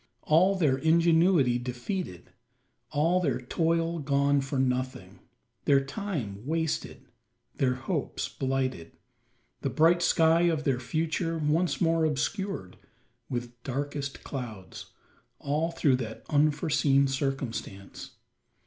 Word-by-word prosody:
All 180 Hz, +6 st, +4 dB
their 145 Hz, -8 st, +2 dB
ingenuity 165 Hz, -4 st, +4 dB
defeated 125 Hz, -, -5 dB, 0.6 s
all 165 Hz, +5 st, +2 dB
their 140 Hz, -9 st, 0 dB
toil 165 Hz, +5 st, 0 dB
gone 140 Hz, -1 st, +2 dB
for 135 Hz, +1 st, -3 dB
nothing 125 Hz, -7 st, -2 dB, 0.5 s
their 140 Hz, -1 st, +4 dB
time 135 Hz, -, -4 dB
wasted 160 Hz, +2 st, -2 dB, 0.5 s
their 125 Hz, -2 st, +2 dB
hopes 140 Hz, +4 st, -3 dB
blighted 130 Hz, -10 st, -2 dB, 0.7 s
the 135 Hz, -, -1 dB
bright 165 Hz, +5 st, +4 dB
sky 165 Hz, -1 st, +4 dB
of 155 Hz, -2 st, -1 dB
their 135 Hz, -4 st, +1 dB
future 165 Hz, +5 st, -1 dB
once 160 Hz, +3 st, +1 dB
more 165 Hz, -2 st, +2 dB
obscured 155 Hz, -, -2 dB, 0.5 s
with 120 Hz, -1 st, -5 dB
darkest 140 Hz, +1 st, -4 dB
clouds 110 Hz, -9 st, -7 dB, 0.5 s
all 150 Hz, +4 st, -1 dB
through 150 Hz, -6 st, +2 dB
that 110 Hz, -3 st, -7 dB
unforeseen 145 Hz, -2 st, +3 dB
circumstance. 130 Hz, -7 st, -4 dB
145 Hz, 105 wpm, -28 LUFS, 130-165 Hz, 0.7 s, All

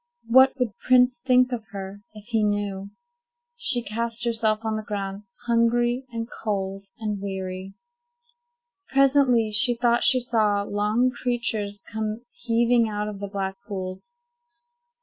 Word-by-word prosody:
What 260 Hz, +4 st, +5 dB
would 235 Hz, -5 st, -2 dB
Prince 250 Hz, -1 st, +4 dB
think 255 Hz, 0 st, +3 dB
of 225 Hz, -3 st, -4 dB
her, 195 Hz, 0 st, -7 dB
if 210 Hz, -1 st, -12 dB
he 225 Hz, -2 st, 0 dB
knew? 205 Hz, -1 st, -2 dB, 0.7 s
She 250 Hz, -, 0 dB
cast 230 Hz, +2 st, -3 dB
herself 225 Hz, -1 st, 0 dB
on 220 Hz, 0 st, 0 dB
the 215 Hz, -, -2 dB
ground, 200 Hz, -1 st, -5 dB, 0.2 s
hungry, 240 Hz, +2 st, +1 dB
and 230 Hz, -1 st, -4 dB, 0.2 s
cold, 195 Hz, -2 st, -3 dB
and 210 Hz, -3 st, -3 dB
weary. 190 Hz, -1 st, -5 dB, 1.1 s
Presently, 265 Hz, -5 st, +3 dB
she 245 Hz, +3 st, +5 dB
thought 235 Hz, 0 st, +2 dB
she 255 Hz, -, +6 dB
saw 215 Hz, -4 st, +1 dB
long 210 Hz, +5 st, +1 dB
creatures 230 Hz, -5 st, -2 dB
come 220 Hz, +2 st, -4 dB
heaving 235 Hz, -4 st, +2 dB
out 210 Hz, 0 st, -3 dB
of 205 Hz, -2 st, -8 dB
the 200 Hz, -, -4 dB
black 195 Hz, -1 st, -4 dB
pools. 190 Hz, -, -6 dB
220 Hz, 135 wpm, -24 LUFS, 205-240 Hz, 1.1 s, she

